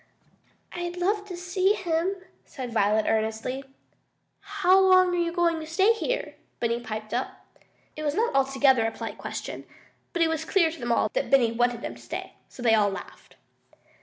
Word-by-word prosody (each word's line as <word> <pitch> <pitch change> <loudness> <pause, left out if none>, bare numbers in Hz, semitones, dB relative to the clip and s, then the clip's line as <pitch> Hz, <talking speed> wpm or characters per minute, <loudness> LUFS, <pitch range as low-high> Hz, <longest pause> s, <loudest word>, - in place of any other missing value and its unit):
"I'd 350 0 -4
love 405 +3 0
to 360 -3 -7
see 370 +3 +1
him," 355 -1 -1 0.3
said 250 -4 -7
Violet 215 0 +2
earnestly. 220 +4 -1 0.8
"How 370 +1 +3
long 370 -1 +5
you 345 -1 0
going 340 -1 +1
to 315 - -7
stay 385 +7 +3
here?" - - -3 0.3
Benny 235 0 0
piped 215 -2 -6
up. 250 +2 -4 0.5
It 305 - -6
was 295 -1 -1
not 460 +4 +1
altogether 270 -3 +3
a - - -2
polite - - -7
question, - - -6 0.5
but 345 - +1
it - - +3
was 320 -1 -2
clear 330 -1 +2
to 325 - -10
them 240 -1 -2
all - - +2
that - - -1
Benny 250 -4 +4
wanted 240 0 0
him - - -4
to - - -15
stay, - - -6 0.2
so 245 - -10
they 230 -2 +4
all 210 -2 +4
laughed. 190 -2 -10
315 Hz, 180 wpm, -26 LUFS, 235-360 Hz, 0.8 s, long